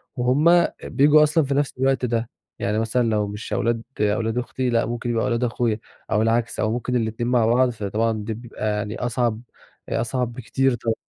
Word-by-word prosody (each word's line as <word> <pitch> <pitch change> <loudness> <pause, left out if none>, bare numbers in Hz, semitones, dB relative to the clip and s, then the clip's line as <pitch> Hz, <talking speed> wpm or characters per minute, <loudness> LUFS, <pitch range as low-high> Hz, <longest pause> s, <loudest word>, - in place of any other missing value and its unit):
وهُم 150 +8 +4 0.2
بييجوا 150 +2 +5
أصلًا 155 +1 +3
في 140 - -1
نَفْس 145 0 0
الوقت 135 -1 +2
ده، 115 -1 -1 0.3
يعني 105 +2 0
مثلًا 115 +2 +1
لو 105 -2 +1
مش 105 +2 -6
أولاد 115 -1 0 0.2
أولاد 110 +3 0
أختي، 125 +1 -2
لأ 115 -1 +2
ممكن 120 +1 -4
يبقى 115 -1 0
أولاد 120 0 0
أخويا 115 -2 0 0.3
أو 105 - +3
العكس 115 +1 0
أو 110 - +1
ممكن 125 +2 -2
الاتنين 115 0 -1
مع 120 -3 +3
بعض، 125 +3 +3
فطبعًا 110 0 -1
دي 110 - -3
بتبقى 115 -1 -5
يعني 105 +1 -3
أصعَب، 120 -2 -1 0.5
أصعَب 120 +1 -1
بكتير 130 +2 0
طبعًا، 115 -1 -1
120 Hz, 185 wpm, -23 LUFS, 110-125 Hz, 0.5 s, بييجوا